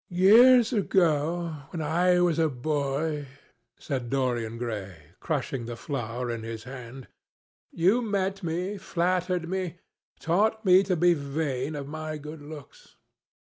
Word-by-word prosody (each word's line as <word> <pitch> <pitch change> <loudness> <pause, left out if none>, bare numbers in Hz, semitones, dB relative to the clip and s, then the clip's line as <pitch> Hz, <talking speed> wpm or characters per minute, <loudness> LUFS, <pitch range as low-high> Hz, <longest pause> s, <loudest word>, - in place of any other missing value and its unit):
"Years 230 +7 +6
ago, 165 - +1
when 170 - -6
I 175 +4 +2
was 170 -2 +2
a 160 -1 +3
boy," 145 +2 -2 0.5
said 130 -5 -4
Dorian 120 -4 -1
Gray, 105 -7 -5 0.2
crushing 135 -6 -3
the 120 - -5
flower 120 -1 -4
in 115 -1 -4
his 115 0 -6
hand, 125 0 -9 0.6
"you 190 +9 +3
met 195 -3 -1
me, 180 +4 -3
flattered 180 -1 -1
me, 190 +2 -1
and 175 -2 -5 0.4
taught 215 +6 +1
me 185 0 +7
to 190 -2 0
be 175 +1 +4
vain 140 -1 -3
of 140 -1 -5
my 155 +1 -5
good 150 +1 -9
looks. 145 -1 -12
155 Hz, 140 wpm, -27 LUFS, 135-180 Hz, 0.6 s, me